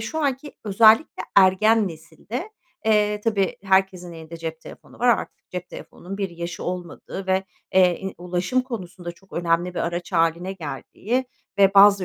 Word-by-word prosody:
şu 265 +8 -4
anki 285 -1 -1
özellikle 220 +6 +5
ergen 200 +3 +5
nesilde, 170 - -7 0.3
eee, 210 -1 +2
tabii, 200 -4 +1
herkesin 190 -2 +1
elinde 165 0 -9
cep 165 -1 -6
telefonu - - -14
var, 245 - +2
artık 235 - 0
cep 180 -1 -5
telefonunun 195 +3 -9
bir 195 -1 -1
yaşı 170 +2 -6
olmadığı 180 +2 -6
ve, 190 0 +1 0.3
eee, 180 -2 +4
i 190 - -5
ulaşım 180 +7 0
konusunda 185 -8 -7
çok 190 +3 -25
önemli 175 +1 0
bir - - -3
araç 175 +2 -3
hâline 170 +2 +1
geldiği 190 - -3 0.3
ve 195 0 +5
bazı 200 -1 +7
190 Hz, 155 wpm, -23 LUFS, 175-210 Hz, 0.3 s, bazı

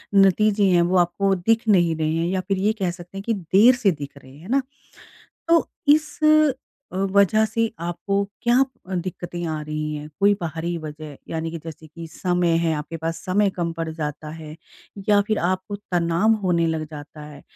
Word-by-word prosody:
नतीजे 200 +2 +4
हैं, 175 -1 +4
वो 175 +2 +2
आपको 180 +3 +2
दिख 225 +6 +1
नहीं 175 -6 +4
रहे 155 0 -1
हैं। 165 +1 0
या 185 +1 -1
फिर 195 - 0
ये 205 +3 +1
कह 185 -3 0
सकते 175 +2 -11
हैं, 195 - -5
कि 230 - 0
देर 200 +6 +4
से 230 -6 +2
दिख 145 -3 -8
रहे 130 -1 -15
हैं। 145 - -15
है 180 - -12
ना? 275 +3 +3 0.9
तो 335 0 +4 0.3
इस 305 -1 -5 0.7
अ, - - -6 0.2
वज़ह 200 +2 +4
से 225 +1 -1
आपको 175 +3 -3 0.3
क्या 240 0 +3 0.4
दिक्कतें 175 -1 -4
आ 155 -1 -3
रही 155 0 -4
हैं? 150 0 -7
कोई 200 +1 +5
बाहरी 170 +1 -3
वज़ह, 155 -2 -8
यानी 160 0 -3
कि 165 - -5
जैसे 160 -1 -9
कि 165 +2 -10
समय 175 +1 0
है, 165 -1 +1
आपके 150 +2 -5
पास 165 +1 -3
समय 200 +2 +2
कम 170 -2 -1
पड़ 165 0 -2
जाता 155 -1 -5
है? 155 -1 -9 0.5
या 205 -1 +6
फिर 215 -1 +1
आपको 185 +3 -2 0.2
तनाव 175 +5 +2
होने 170 -2 +2
लग 160 -1 -1
जाता 150 0 -10
है? 150 -1 -12
175 Hz, 195 wpm, -23 LUFS, 160-200 Hz, 0.9 s, या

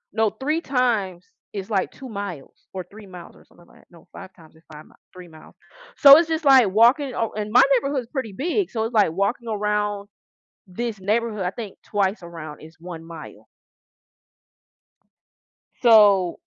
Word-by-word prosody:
no, 220 -1 +2
3 290 +10 -3
times 220 - -1 0.3
is 200 +2 -7
like 195 -2 -1
2 265 - -11
miles 200 - -8
or 185 -2 -7
3 210 -1 -13
miles 180 -2 -12
or - - -20
something 175 - -22
like - - -21
that - - -25
no, 170 -2 -20
5 190 - -11
times 160 -2 -19
is 160 - -22
5 150 0 -12
mi - - -22 0.2
3 180 -1 -12
miles. 155 -1 -17 0.4
So 280 +1 +9
it's 330 0 +2
just 320 -1 -3
like 260 -6 +6
walking 245 +7 +3
oh, 225 - -2
and 210 0 -4
my 250 +3 +6
neighborhood 275 +1 0
is 235 - -14
pretty 260 -7 -4
big, 345 - -2
so 220 -2 -3
it's 225 +2 -4
like 210 -7 +3
walking 200 +7 -2
around 210 -1 -2 0.6
this 215 +2 -5
neighborhood, 215 +1 -1
I - - 0
think 215 -2 -9
twice 200 0 -1
around 160 -3 -10
is 160 +1 -14
1 170 -1 -9
mile. 165 0 -12 2.4
So, 205 -6 +5
210 Hz, 180 wpm, -22 LUFS, 185-240 Hz, 2.4 s, So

